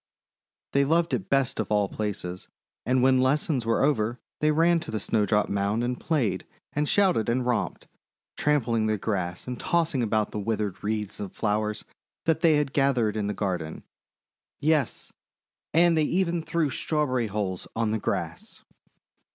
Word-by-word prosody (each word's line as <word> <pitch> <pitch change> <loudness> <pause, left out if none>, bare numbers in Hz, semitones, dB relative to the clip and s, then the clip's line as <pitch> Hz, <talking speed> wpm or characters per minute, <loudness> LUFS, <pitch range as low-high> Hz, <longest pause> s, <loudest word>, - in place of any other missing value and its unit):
They 140 - +3
loved 165 +4 +2
it 185 - -2
best 135 -1 +1
of - - -2
all 105 -1 +3
places, 95 -4 -4 0.4
and 125 0 +3
when 130 -1 +5
lessons 130 -2 +1
were 115 - +2
over 120 -4 +1 0.2
they 155 - +3
ran 165 +3 +4
to 170 - -9
the 110 - -2
Snowdrop 105 0 +1
Mound 100 +3 0
and 125 0 -2
played 115 - 0 0.3
and 150 0 0
shouted 185 - +3
and 125 +1 +1
romped, 125 -2 -1 0.5
trampling 120 -7 +1
the 110 0 +1
grass 90 -4 -3
and 125 -1 -4
tossing 165 -6 +1
about 110 -2 0
withered 105 -2 -2
wreaths 105 -1 -2
of 100 -3 -6
flowers 105 0 -1 0.4
that 160 -1 +2
they 165 -2 +5
had 145 -2 0
gathered 125 -6 +2
in 105 -2 -1
the 105 - -2
garden, 90 -6 -3 0.4
— - - -67
yes, 150 -4 0 0.6
and 170 +1 +4
they 160 - +3
even 175 +2 +1
threw 160 -2 0
Strawberry 130 -4 0
hulls 100 -3 -3
on 115 -1 0
the 110 - 0
grass. - - -4
120 Hz, 160 wpm, -26 LUFS, 105-150 Hz, 0.6 s, when